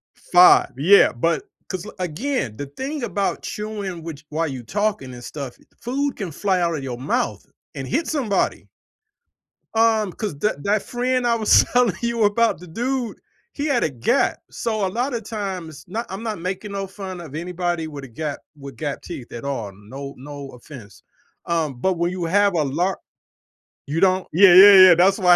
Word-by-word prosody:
5, 180 0 +5
yeah, 185 +9 +6
but 165 - 0 0.3
cause 185 -2 -4
l - - -9
again, 180 - -2
the 145 - -4
thing 265 - -5
about 200 -4 -2
chewing 205 -5 -5
which 155 -2 -8
while 160 +2 -1
you 130 -4 -6
talking 200 - -2
and 120 - -10
stuff 140 -1 -7
i - - -22 0.2
food 275 +3 -1
can 195 -6 -4
fly 190 +3 0
out 170 -1 +1
of 140 - -5
your 125 -2 -5
mouth 130 - -2 0.3
and 135 - -5
hit 310 +6 -1
somebody. 250 -10 -1 1.1
Um, 225 -3 +3
'cause 200 -8 -5
that 145 -7 -1
that 205 +1 +1
friend 250 0 -1
I 235 - +3
was 220 -2 +5
telling 245 -7 +3
you 235 -1 0
about, 220 -3 +2
the 180 - -12
dude, 240 +6 -3 0.4
he 290 - -3
had 275 -5 +2
a - - 0
gap, 135 - +1
so 220 -3 -2
a - - +1
lotta 240 +3 -2
times 190 -8 -6
not 225 +6 -4
I'm 195 +4 -6
not 220 -5 -3
making 190 +3 -4
no 195 -1 -3
fun 190 -2 -7
of 155 -4 -10
anybody 175 0 -2
with 145 -3 -8
a - - -8
gap 150 +4 -4 0.2
with 140 -1 -9
gap 145 -3 -4
teeth 150 -9 -9
at 120 - -7
all, 125 -8 -3
no 135 +8 -9
no 140 +1 -9
offense, 120 -5 -13 0.4
um, 160 -5 -1
but 190 +8 +1
when 170 +1 0
you 180 -2 -3
have 200 +3 +3
a 160 - +2
lar 170 +7 -1 0.9
You 155 +4 -2
don't 185 -1 +3
Yeah, 185 +1 +7
yeah, 200 +3 +10
yeah, 175 - +8
that's 190 +4 +4
why 180 -3 +6
180 Hz, 190 wpm, -22 LUFS, 150-215 Hz, 1.1 s, yeah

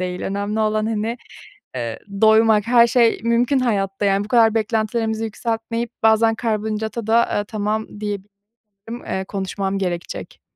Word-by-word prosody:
değil. 180 0 -3
Önemli 205 +2 -2
olan, 215 0 +1
hani, 225 +1 -2 0.6
eee, 115 -3 -4 0.2
doymak. 220 -1 +5
Her 235 0 +6
şey 235 -1 +3
mümkün 235 +4 +2
hayatta, 200 -5 -1
yani, 200 0 +2
bu - - -10
kadar 225 -2 +4
beklentilerimizi 220 0 -1
yükseltmeyip 230 +1 -3
bazen 225 0 +4
karbonhidrata 220 0 -2
da, 230 +1 +4
eee, 205 - 0
tamam 215 +1 -2
diyebilirim. 205 -1 -6 0.6
Eee, 190 - -2
konuşmam 195 0 -3
gerekecek. 180 -3 -5
220 Hz, 135 wpm, -21 LUFS, 200-225 Hz, 0.6 s, Her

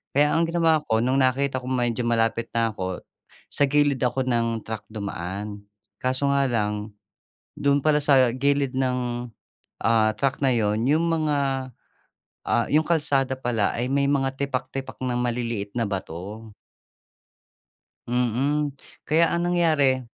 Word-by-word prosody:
Kaya 145 +1 +4
ang 165 - +3
ginawa 165 -2 +3
ko, 110 - +2
no'ng 130 +2 +2
nakita 130 +1 +1
kong 130 +1 -2
medyo 120 -1 0
malapit 115 0 +1
na 115 -1 +2
'ko, 95 -2 -4 0.5
sa - - +1
gilid 145 -1 +2
ako 125 +1 +1
ng 115 -2 0
truck 110 -2 -5
dumaan. 100 0 -5 0.4
Kaso 130 +2 0
nga 140 -1 +2
lang, 105 -2 -2 0.6
do'n 140 0 +3
pala 150 -1 +3
sa 130 -4 +4
gilid 140 0 +1
ng, 125 -2 -1 0.6
ah, 110 -1 +3
truck 135 +4 -1
na 130 - +4
'yon, 110 0 +1
'yong 155 +4 +3
mga, 140 -5 0 0.8
ah, 115 +1 +2
'yong 155 +2 +4
kalsada 140 -5 +1
pala 120 -5 0
ay 120 +2 -1
may 140 0 +2
mga 135 -2 +1
tipak-tipak 135 -1 -3
ng 125 -1 -1
maliliit 115 -4 -2
na 115 - +1
bato. 100 +3 -6 1.6
Mm. 130 +5 0 0.3
Kaya 165 +2 +3
ang 175 +1 0
nangyari, 155 -7 +3
130 Hz, 140 wpm, -24 LUFS, 115-140 Hz, 1.6 s, Kaya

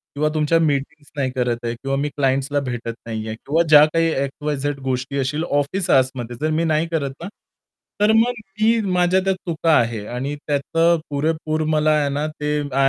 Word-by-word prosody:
किंवा 150 +1 +1
तुमच्या 155 +2 +2
मीटिंग्स 145 -1 -2
नाही 130 -3 -1
करत 120 -2 0
आहे 115 - -1
किंवा 135 +3 -3
मी 145 +1 -1
क्लायंटसला 140 0 0
भेटत 120 -1 -4
नाहीये 110 -1 -4
किंवा 155 +8 0
ज्या 150 0 +9
काही 165 0 +3 0.2
एक्स-वाय-झेड 145 0 -3
गोष्टी 130 +1 -2
असतीलल 150 +4 -1
ऑफिस 150 +4 -1
आवर्समध्ये, 130 -2 +1
जर 155 - +1
मी 160 +2 +1
नाही 160 0 +1
करत 145 -5 -1
ना. - - -4 0.7
तर 210 - +5
मग 235 +2 +4 0.3
मी 225 +1 +4
माझ्या 180 +1 +3
त्या 195 0 +2
चुका 165 -3 -1
आहे 115 -3 -1
आणि 130 +6 -4
त्याचं 165 +4 +2
पुरेपूर 155 +2 -1
मला 155 0 +3
आहे 145 - 0
ना, 145 +2 -1
ते 150 -1 -2
आय 140 -1 0
145 Hz, 180 wpm, -21 LUFS, 135-160 Hz, 0.7 s, ज्या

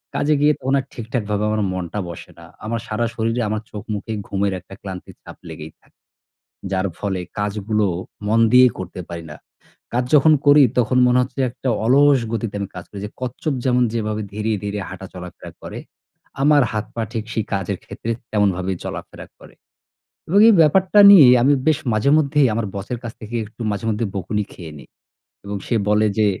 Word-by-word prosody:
কাজে 150 +1 +2
গিয়ে 150 +1 +5
তখন 135 +1 -1
আর 135 - -5
ঠিকঠাকভাবে 110 -3 -3
আমার 110 0 0
মনটা 95 +2 -4
বসে 85 - -10
না। - - -12 0.2
আমার 115 +2 -2
সারা 110 +2 -1
শরীরে, 115 +2 -1
আমার 110 0 -2
চোখ-মুখে 105 +1 -6 0.2
ঘুমের 100 0 -1
একটা 90 +2 -15
ক্লান্তির 95 -2 -8
ছাপ - - -12
লেগেই 75 +1 -8
থাকে, - - -31 0.7
যার 95 0 0
ফলে 95 -3 -2 0.2
কাজগুলো 105 +1 -1 0.4
মন 110 +2 +2
দিয়েই 125 0 +7
করতে 95 0 -7
পারি 85 -1 -6
না। - - -8 0.6
কাজ 125 +1 +1
যখন 155 +2 +6
করি, 145 0 +7 0.2
তখন 125 +1 +1
মনে 125 +1 +3
হচ্ছে 130 +2 -5
একটা 130 - -4 0.2
অলস 140 +3 +5
গতিতে 115 -2 -3
আমি 100 - -3
কাজ 90 - -7
করি, 100 - -9
যে 105 - -8
কচ্ছপ 130 +4 -3
যেমন 125 -1 +3
যেভাবে 110 -2 -2
ধীরে 110 +1 -2
ধীরে 105 0 -3
হাঁটা 95 +1 -8
চলাফেরা 90 -1 -10
করে, - - -7 0.6
আমার 145 0 +5
হাত 105 0 -2
পা 115 - -1
ঠিক 110 -2 -2
সেই 110 - -1
কাজের 95 0 -2
ক্ষেত্রে 115 - -5 0.2
তেমনভাবে 95 -3 +1
চলাফেরা - - -8
করে - - -16 0.7
এবং 195 +5 +4
এই 225 - +7
ব্যাপারটা 185 +6 +4
নিয়ে 180 -9 +9 0.2
আমি 140 +3 +4 0.2
বেশ 155 -2 +3
মাঝেমধ্যেই 140 +4 +3
আমার 115 -1 -1
বসের 100 +5 -4
কাছ 115 - -5
থেকে 110 +2 -6
একটু 115 +3 -10
মাঝেমধ্যেই 110 0 -2
বকুনি 105 +3 -2
খেয়ে 80 -4 -10
নিই। - - -14 0.6
এবং 100 0 -4
সে - - -1
বলে 105 +1 +3
যে, 110 - +4
110 Hz, 180 wpm, -20 LUFS, 100-125 Hz, 0.7 s, নিয়ে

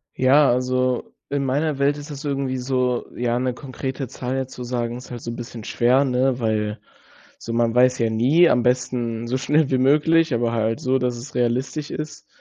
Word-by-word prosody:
Ja. 135 +3 +5
Also, 125 0 0 0.2
in 140 -1 -1
meiner 145 +2 0
Welt 145 +1 +2
ist 145 +1 -9
das 145 0 -7
irgendwie 135 -2 -2
so 125 -1 -1
ja, 120 0 0
'ne 125 0 -1
konkrete 130 0 -5
Zahl 130 +1 -4
jetzt 130 -1 -4
zu 125 - -7
sagen 120 -1 -2
ist 125 - -11
halt 120 - -6
so 115 - -5
'n - - -6
bisschen 115 -2 -8
schwer, 125 +4 +3
ne? 130 0 +1
Weil 110 -1 -1 0.6
so 115 - -6
man 115 0 +1
weiß 125 0 +4
ja 115 -1 +2
nie 140 +10 +4
am 120 -1 +2
besten, 120 -2 -1
so 130 +2 0
schnell 150 +2 +2
wie 130 - +2
möglich, 155 +3 +3
aber 115 0 0
halt 115 0 0
so, 130 +1 +1
dass 125 -1 -1
es 135 +6 -10
realistisch 125 +5 -1
ist. 155 0 -6
125 Hz, 205 wpm, -22 LUFS, 120-135 Hz, 0.6 s, Ja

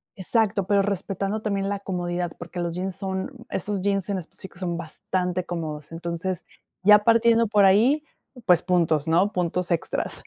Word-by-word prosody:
exacto, 200 0 0
pero, 200 -1 +4
respetando 200 +1 -2
también 200 -2 -1
la 200 0 -2
comodidad, 175 -3 -3
porque, 175 +1 -7
los 170 -1 -2
jeans 185 +1 -3
son 190 +4 -3 0.2
esos 200 0 -2
jeans 195 -1 0
en 195 - 0
específico 180 +1 -12
son 175 -2 -2
bastante 180 +2 -2
cómodos. 155 -4 -5
Entonces, 170 +2 -4 0.4
ya 210 +1 +8
partiendo 230 0 +4
por 205 -1 +4
ahí, 240 +11 +4 0.4
pues 180 -3 +5
puntos, 165 -4 +1
¿no?, 180 +6 +3
puntos 180 0 -1
extras. 170 - -2
185 Hz, 160 wpm, -25 LUFS, 175-200 Hz, 0.4 s, ya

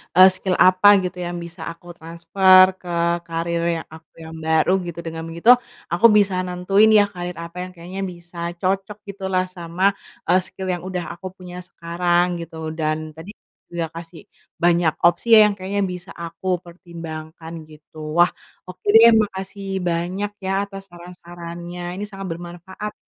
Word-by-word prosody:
eee, 185 +1 +9
skill 185 0 -2
apa 185 +2 +5 0.2
gitu 180 0 -4
yang 175 0 -4
bisa 170 0 -11
aku 170 +1 -16
transfer 175 +3 +5 0.2
ke 180 - -10 0.4
karier 170 0 -2 0.2
yang - - -37
aku 160 0 -17
yang 160 0 -9
baru, 160 +2 +3 0.2
gitu. 170 0 -6
Dengan 165 0 -5
begitu 170 +8 0 0.4
aku 175 +7 +2
bisa 200 -2 +3
nentuin 185 +4 +3
ya - - +6
karier 175 -1 -5
apa 170 +1 -12
yang 185 - -8
kayaknya 180 +3 -7
bisa 170 0 -16 0.2
cocok 195 +2 -1
gitulah 190 -2 -1
sama, 175 +1 -5 0.4
eee, 185 - +5
skill 190 0 -8
yang 175 - -4
udah 180 -2 -3
aku 170 +2 -13
punya 180 -1 -10
sekarang 175 +1 0 0.2
gitu, 165 0 -10 0.2
dan 155 0 0 0.2
tadi 165 +5 -10 0.3
juga 170 -2 -4
kasih 165 -1 -10 0.4
banyak 170 -2 +3
opsi 170 +3 +3
ya 220 - +10
yang - - -2
kayaknya 195 +2 -2
bisa 180 +2 -9
aku 170 +2 -8
pertimbangkan 165 -2 -9 0.2
gitu. 155 +1 -17 0.2
Wah 175 +1 +6 0.4
oke 185 - -12
deh, 230 +1 +10
makasih 195 0 -7 0.2
banyak 180 +5 -2 0.2
ya 190 - -1 0.2
atas 195 -1 -9
saran-sarannya, 175 0 -9 0.2
ini 205 - -4
sangat 195 -2 -8
bermanfaat 175 +5 -7
175 Hz, 160 wpm, -21 LUFS, 170-190 Hz, 0.4 s, ya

